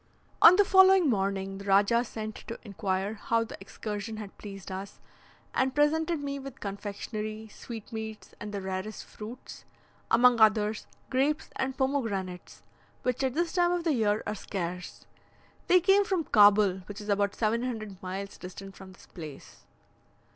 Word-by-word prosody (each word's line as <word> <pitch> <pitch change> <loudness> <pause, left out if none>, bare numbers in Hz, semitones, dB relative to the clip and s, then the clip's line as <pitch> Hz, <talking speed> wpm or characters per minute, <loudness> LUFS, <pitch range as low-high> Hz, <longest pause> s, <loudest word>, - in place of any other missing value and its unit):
On 350 - +10
the 410 +1 +5
following 380 -2 +6
morning 195 -1 -1
the 200 - -9
Rajah 200 +4 +4
sent 220 -2 -6
to 230 - -5
inquire 200 -1 -2
how 230 +2 0
the 225 - -8
excursion 210 +2 -5
had 210 -2 -8
pleased 195 -2 -8
us, 195 +2 -7 0.5
and 260 0 +1
presented 310 +1 +2
me 280 0 -3
with 275 -2 -9
confectionery, 210 +2 -5
sweetmeats, 220 -1 -8
and 210 0 -6
the 200 -1 -4
rarest 190 +3 -4
fruits; 225 +4 -10 0.5
among 240 0 +5
others, 215 0 +3 0.2
grapes 285 +4 +1
and 265 0 -2
pomegranates, 220 -10 -2 0.4
which 250 +1 0
at 260 -1 0
this 340 0 0
time 350 -1 +3
of 355 -1 0
the 325 -3 +2
year 215 -4 +1
are 210 - -2
scarce. 180 -3 -5 0.6
They 365 - +6
came 390 +3 +4
from 380 -4 0
Cabul, 205 -5 +5
which 205 0 -7
is 210 - -9
about 200 0 +1
700 220 -3 -2
miles 190 +2 -6
distant 195 +2 -9
from 190 -1 -12
this - - -17
place. 155 -6 -11
215 Hz, 155 wpm, -29 LUFS, 200-265 Hz, 0.6 s, On